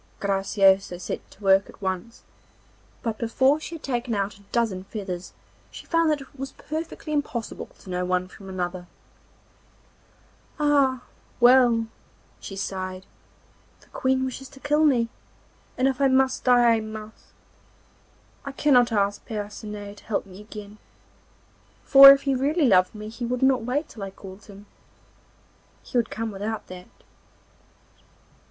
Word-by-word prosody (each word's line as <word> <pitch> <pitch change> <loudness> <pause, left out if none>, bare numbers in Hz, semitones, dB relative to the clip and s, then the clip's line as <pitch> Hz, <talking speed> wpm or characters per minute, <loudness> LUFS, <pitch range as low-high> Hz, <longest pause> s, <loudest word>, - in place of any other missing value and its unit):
Graciosa 195 -2 +2
set 180 - -6
to 205 - -18
work 195 0 +4
at - - -15
once, 190 +4 -4 0.8
but 225 -2 -3
before 260 +5 +2
she 330 +1 -7
had 320 - -11
taken 245 -3 -2
out 200 0 -1
a 205 - -19
dozen 220 -6 0
feathers 190 -4 -6 0.4
she - - -11
found 330 -1 +2
that 300 -2 0
it 270 0 -15
was 270 0 -5
perfectly 315 0 -6
impossible 270 -6 -3
to - - -17
know 180 0 -1
one 180 0 0
from 195 +1 -13
another. 180 -1 -4 1.7
'Ah! 280 -4 +2 0.4
well,' 240 -2 +5 0.5
she 195 - -8
sighed, 185 -1 -5 0.8
'the - - -23
Queen 260 0 0
wishes 260 +1 -6
to 270 - -15
kill 295 +2 +2
me, 245 -6 +3 0.7
and 255 - +3
if 270 0 -1
I 275 - +5
must 260 0 +2
die 245 -2 +5
I - - -1
must. 215 0 -9 1.2
I 275 - -6
cannot 255 -5 +4
ask 205 -1 0
Percinet 205 -1 -6
to - - -17
help 210 -2 -2
me 190 +1 -12
again, 210 0 -11 1.0
for 275 0 +10
if 275 0 +3
he 275 - +1
really 285 +5 +1
loved 185 -2 +4
me 210 0 -7
he 235 +2 -8
would 250 +2 -2
not 265 -2 +4
wait 260 +7 -2
till 215 - -11
I 195 - -4
called 190 +1 -12
him, 200 0 -13 1.2
he - - -13
would 235 -2 +2
come 225 0 -4
without 210 +2 -4
that. 180 0 -10
225 Hz, 150 wpm, -25 LUFS, 195-265 Hz, 1.7 s, for